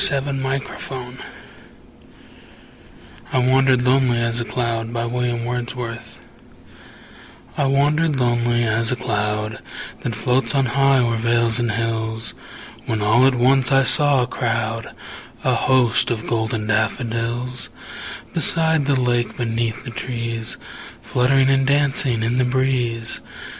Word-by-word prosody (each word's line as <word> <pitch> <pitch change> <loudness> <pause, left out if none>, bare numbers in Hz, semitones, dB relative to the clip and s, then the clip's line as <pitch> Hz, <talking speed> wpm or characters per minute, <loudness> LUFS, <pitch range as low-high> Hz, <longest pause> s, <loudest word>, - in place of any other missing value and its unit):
William 135 -1 -2
Wordsworth 130 -1 -5 2.1
I - - 0
Wandered 130 0 +3
Lonely 125 -1 +3
As 115 0 0
a - - -3
Cloud 115 -1 -2 2.6
I 140 - 0
WANDERED 145 +3 +2
lonely 120 -1 +1
as 115 +2 +1
a - - +1
cloud 105 -2 -2 0.4
That 115 - -3
floats 125 +5 0
on 135 -1 +3
high 135 +2 +3
o'er 120 -2 +1
vales 115 +1 +1
and 120 -2 0
hills, 110 -1 -2 0.5
When 110 -2 -1
all 115 +5 +5
at 135 - +2
once 130 +2 +3
I 135 0 +5
saw 140 -1 +4
a - - 0
crowd, 115 -2 -3 0.5
A 130 - +2
host, 120 -1 +3
of 115 -2 -3
golden 110 -1 -1
daffodils; 115 +3 -2 0.6
Beside 160 -2 +2
the 140 -2 +2
lake, 120 -1 0
beneath 115 0 -2
the 120 - -5
trees, 115 -2 -4 0.5
Fluttering 130 +2 +2
and 135 0 +2
dancing 140 -4 +2
in 115 +2 0
the 130 - +3
breeze. 125 -3 -1
120 Hz, 120 wpm, -20 LUFS, 115-135 Hz, 2.6 s, all